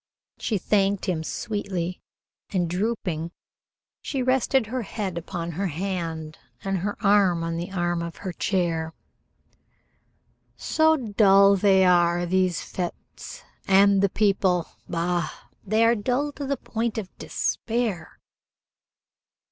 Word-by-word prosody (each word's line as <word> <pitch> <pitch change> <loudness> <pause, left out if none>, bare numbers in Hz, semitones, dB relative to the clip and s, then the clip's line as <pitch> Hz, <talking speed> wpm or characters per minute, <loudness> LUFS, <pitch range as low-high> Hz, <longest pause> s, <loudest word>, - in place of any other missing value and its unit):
She 215 - -1
thanked 200 0 +1
him 165 -4 -1
sweetly, 185 -2 -3 0.5
and, 180 -4 0
drooping, 180 -3 -2 0.7
she 270 -3 -2
rested 260 0 +2
her 250 +4 -3
head 200 -4 -4
upon 170 0 -4
her 190 +5 -2
hand 165 -2 -4 0.2
and 195 -2 -1
her 205 +3 -3
arm 195 -4 +4
on 165 0 -2
the 170 +3 -4
arm 175 -2 -1
of 170 0 -5
her 185 -3 -6
chair. 165 -4 -1 1.6
"So 315 0 +3
dull 200 -4 +5
they 190 -1 +4
are, 175 -1 +3
these 185 -1 +1
fêtes, 180 -2 -7 0.2
and 195 0 +5
the 200 - +3
people 190 -4 +1 0.2
bah! 170 -1 -1 0.3
They 220 +3 +2
are 230 - +5
dull 250 +6 -1
to 285 -1 -6
the 280 0 -1
point 230 0 -3
of 200 -4 -6
despair." 220 -8 -2
190 Hz, 125 wpm, -25 LUFS, 175-215 Hz, 1.6 s, dull